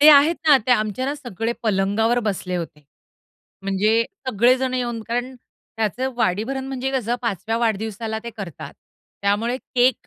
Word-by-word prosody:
ते 300 - +9
आहेत 295 +4 +7
ना, 290 - +9
ते 255 - +1
आमच्या 215 +2 0
ना 285 - -1
सगळे 235 -5 -3
पलंगावर 215 +3 +2
बसले 185 -2 -2
होते. 160 -3 -6 0.8
म्हणजे 210 +4 +2 0.2
सगळेजण 255 +3 +3
येऊन 240 -2 -2
कारण 245 +2 -2 0.4
त्याचं 245 +5 -1
वाढीभरण 240 +5 0
म्हणजे 265 0 -2
कसं 240 -3 0
5 205 -6 -2
व्या 225 +1 +1
वाढदिवसाला 220 0 -1
ते 235 - -4
करतात. 190 - -7 0.5
त्यामुळे 215 +5 +1
केक 255 -2 +1
230 Hz, 150 wpm, -22 LUFS, 205-255 Hz, 0.8 s, ते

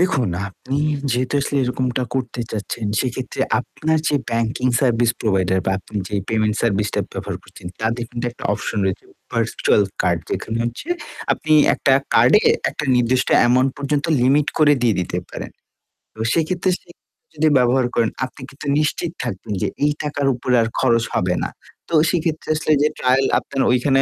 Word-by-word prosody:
দেখুন, 160 - +2 0.2
আপনি 130 +8 -5 0.3
যেহেতু 125 +3 0
আসলে 140 +1 -2
এরকমটা 125 0 -1
করতে 125 -2 -2
চাচ্ছেন 110 +1 -4
সেক্ষেত্রে 130 0 -4 0.2
আপনার 160 +5 -1
যে 145 - +2
ব্যাংকিং 115 +2 0
সার্ভিস 120 -3 +3
প্রোভাইডার 95 -3 +1
বা - - +2
আপনি 105 +2 -9
যে 105 - -5
পেমেন্ট 110 -1 +1
সার্ভিসটা 105 -2 +1
ব্যবহার - - -4
করছেন, - - -13
তাদের 115 +2 -1
কিন্তু 120 0 -5
একটা 120 - -12
অপশন 105 +1 -3
রয়েছে 95 -1 -2 0.3
ভার্চুয়াল 105 - +2 0.2
কার্ড 85 -2 +1
যেখানে 110 +1 -2
হচ্ছে 120 - -5 0.4
আপনি 155 - -1 0.2
একটা 135 - +2 0.2
কার্ডে 125 - +6 0.3
একটা 150 - -5
নির্দিষ্ট 125 +1 +2
অ্যামাউন্ট 130 +2 +4
পর্যন্ত 140 +1 -1 0.2
লিমিট 140 +4 +3
করে 150 -2 +6
দিয়ে 115 -3 +3
দিতে 90 - -2
পারেন। - - -7 0.6
এবং 110 0 -4
সেইক্ষেত্রে 175 +3 0
সে - - -28 0.4
যদি 155 0 +2
ব্যবহার 125 +1 +3
করেন 115 -2 +2 0.2
আপনি 130 - -13
কিন্তু 140 - -11
নিশ্চিত 155 +2 -1
থাকবেন 95 +2 -5
যে - - +1 0.2
এই 150 - +4
টাকার 145 -1 -1
উপরে 125 +1 0
আর 115 - +1
খরচ 115 -1 +3
হবে 90 0 +1
না। - - -2 0.4
তো - - -7 0.2
সেক্ষেত্রে 160 -2 -1
আসলে 155 0 -1
যে - - +5
ট্রায়াল 130 +1 +3
আপনার 135 - -3
ওইখানে 135 +2 +3
125 Hz, 165 wpm, -20 LUFS, 115-145 Hz, 0.6 s, কার্ডে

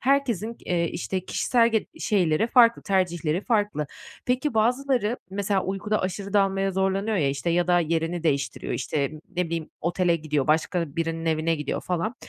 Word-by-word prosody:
Herkesin 240 -5 +1
g - - -20
eee, 170 -2 +1
işte, 185 +1 -3
kişisel 235 +3 +2
ge 220 -2 0
şeyleri 185 -3 +2
farklı, 235 -1 +5
tercihleri 175 -4 0
farklı. 205 - 0 0.4
Peki, 255 +1 0
bazıları, 245 0 +1
mesela, 195 -1 0
uykuda 195 +3 -1
aşırı 195 +2 -4
dalmaya 195 -1 +2
zorlanıyor 195 +3 0
ya, 150 -6 +2
işte, 140 +5 -1
ya 175 0 +2
da 175 -1 +4
yerini 165 +1 -1
değiştiriyor, 140 -6 -1
işte, 140 +2 -1 0.3
ne 180 - +2
bileyim, 165 -1 -4
otele 175 0 +1
gidiyor, 150 -3 -1
başka 160 0 0
birinin 165 0 -2
evine 160 +1 +1
gidiyor 150 -2 -3
falan. 180 +6 -2
185 Hz, 160 wpm, -25 LUFS, 165-210 Hz, 0.4 s, farklı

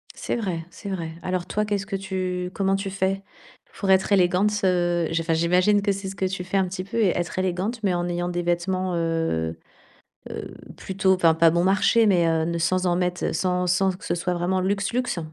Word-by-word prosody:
C'est - - -3
vrai, 180 -8 -3
c'est 200 - -8
vrai. 170 -4 -4
Alors 185 -1 -2
toi, 210 +3 -1
qu'est-ce 205 -1 -2
que 200 0 -4
tu 185 -2 -3
comment 195 -1 +1
tu 195 0 -3
fais? 195 0 -1 0.6
Pour 195 -1 +1
être 190 +2 +3
élégante, 185 +1 +3
heu, 175 -2 +2
j 165 0 0
enfin, 165 0 0
j'imagine 180 +5 +3
que 200 0 +1
c'est 195 0 -4
ce 195 - -7
que 190 - -1
tu 185 -1 -3
fais 185 +2 -1
un 190 -1 +2
petit 185 +1 -5
peu 220 +5 -6
et 215 -4 +4
être 175 0 -3
élégante, 190 +6 -2
mais 190 -3 +2
en 175 0 -1
ayant 175 0 -2
des 175 0 -2
vêtements, 180 +1 -1
heu, 165 - -1 0.8
heu, - - -7 0.2
plutôt, 190 0 +1
enfin, 170 -3 +4
pas 165 0 +5
bon 170 +1 +1
marché, 200 +4 +4
mais, 180 -4 +4
heu, 160 -1 +1
ne 170 0 -2
sans 185 +2 +1
en 175 - +2
mettre 180 0 -1
sans 180 -1 0
sans 185 +2 +2
que - - -15
ce - - 0
soit 175 +1 -1
vraiment 180 +2 0
luxe, 200 +2 -1
luxe. 250 -7 -1
185 Hz, 225 wpm, -24 LUFS, 175-195 Hz, 0.8 s, pas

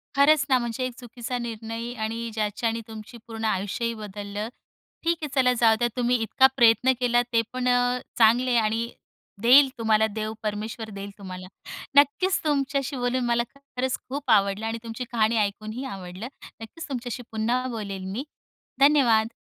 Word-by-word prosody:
खरंच 290 +1 +5
ना, 260 - +5
म्हणजे 240 +1 -3
एक 250 - -4
चुकीचा 245 +1 -5
निर्णय 230 0 -5
आणि 230 +1 -3
ज्याच्याने 225 +2 -1
तुमची 220 +2 -10
पूर्ण 225 -1 -5
आयुष्यही 215 +4 -1
बदललं. 205 0 -6 0.5
ठीक 335 0 +1
आहे 300 - -2
चला 250 -1 +4
जाऊ 225 -2 +5
द्या 240 - +2
तुम्ही 245 0 +2
इतका 265 +4 +5
प्रयत्न 240 +2 +5
केला 240 -1 +3
तेपण 250 +2 0
अ, 245 0 +2 0.2
चांगले 240 +3 +4
आहे 235 - +4
आणि 225 +2 0 0.5
देईल 265 +3 +7
तुम्हाला 220 -1 +3
देव 215 +1 -4
परमेश्वर 215 +1 -4
देईल 200 +1 -6
तुम्हाला. 185 -2 -8 0.5
नक्कीच 290 +7 +4
तुमच्याशी 275 -1 0
बोलून 245 0 0
मला 235 0 +2
खरंच 260 -2 -3
खूप 280 +2 -5
आवडलं 200 +1 +3
आणि 225 +1 -2
तुमची 230 +2 -5
कहाणी 225 0 +2
ऐकूनही 215 +4 -2
आवडलं. 190 0 -7 0.3
नक्कीच 325 +10 -8
तुमच्याशी 245 -1 -4
पुन्हा 235 +4 0
बोलेल 200 -5 -5
मी 255 +6 -3 0.6
धन्यवाद. 255 -6 +5
230 Hz, 155 wpm, -25 LUFS, 220-255 Hz, 0.6 s, देईल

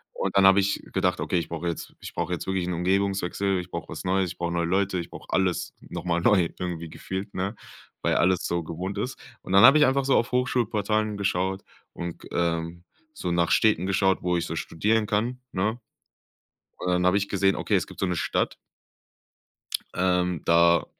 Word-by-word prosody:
Und - - -1
dann 95 - +6
habe 95 +1 +7
ich 100 0 0
gedacht: - - +1
„Okay, - - 0
ich 85 - -5
brauche 85 +1 -4
jetzt 85 - -5
ich - - -9
brauche - - -2
jetzt - - -4
wirklich 95 -2 -1
'n 90 - -1
Umgebungswechsel, 95 +1 0
ich 90 0 -8
brauche - - -5
was - - -6
Neues, 95 -1 +1
ich - - -11
brauche 85 0 -2
neue 85 -1 0
Leute, 95 +1 +1
ich 85 - -6
brauche - - -11
alles 95 -2 0
noch - - -7
mal 85 -1 +1
neu 90 -3 +4
irgendwie 85 -2 -4
gefühlt“, 95 +5 -6
ne? 95 +4 -2 0.5
Weil - - +2
alles 90 0 +2
so 85 -1 -1
gewohnt 90 +5 -5
ist. 125 +6 -3 0.2
Und 95 - -6
dann 100 - +7
habe 135 +5 +9
ich 150 - +6
einfach 135 +1 +2
so 135 - +3
auf 115 - +1
Hochschulportalen 110 -4 0
geschaut 95 -1 -1 0.3
und 85 -1 -6
g - - -12
ähm, 85 0 -1 0.3
so 90 - -3
nach 85 0 +1
Städten 105 -5 +3
geschaut, 95 -1 +2
wo 90 -1 +1
ich 85 - -1
so 80 - -4
studieren 105 +7 0
kann, 120 +5 -1
ne? 110 +6 -1 1.0
Und 90 - -3
dann 90 0 +2
habe 90 +2 +4
ich 100 0 -1
gesehen, 95 -1 +2
okay, - - 0
es - - +1
gibt - - -13
so - - +3
'ne 90 -1 -1
Stadt - - 0 1.4
ähm, 90 -2 +1
da 85 0 +4
95 Hz, 205 wpm, -26 LUFS, 85-100 Hz, 1.4 s, habe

